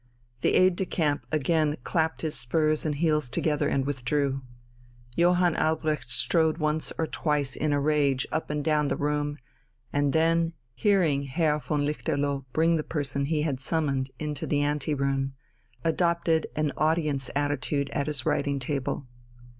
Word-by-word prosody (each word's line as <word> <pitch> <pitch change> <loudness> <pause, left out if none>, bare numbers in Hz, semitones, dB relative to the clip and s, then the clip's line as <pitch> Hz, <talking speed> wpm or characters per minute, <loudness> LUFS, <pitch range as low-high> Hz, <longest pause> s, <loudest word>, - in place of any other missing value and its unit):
The - - +2
aide 185 -1 +4
de 190 - 0
camp 145 -4 -1
again 155 0 +1
clapped 160 -1 0
his 155 -2 -1
spurs 155 +4 +2
and 150 - -1
heels 150 -3 +1
together 150 +3 0
and 135 -1 0
withdrew. 140 0 -1 0.7
Johann 175 0 +3
Albrecht 155 -4 0
strode 160 +4 +2
once 155 -1 0
or 160 - +1
twice 150 -4 -1
in 150 0 0
a 145 - +2
rage 140 -3 +2
up 160 - -2
and 150 0 -2
down 150 -1 +2
the - - 0
room, 145 0 -1 0.6
and 145 -1 +2
then, 165 +1 +2 0.2
hearing 165 - +2
Herr 150 +2 +1
von 145 -1 -1
Lichterloh 145 -2 -1
bring 165 +3 +3
the 155 - -2
person 140 -3 -2
he 150 0 0
had 140 -5 -1
summoned 135 -3 0
into 150 -2 -4
the 145 -1 +1
ante 145 +1 0
room, 135 -1 -1 0.5
adopted 170 -1 +1
an 155 -1 0
audience 155 -4 +1
attitude 145 0 0
at 140 0 -1
his 145 -5 -1
writing 140 0 +1
table. 135 0 -3
150 Hz, 155 wpm, -27 LUFS, 140-160 Hz, 0.7 s, aide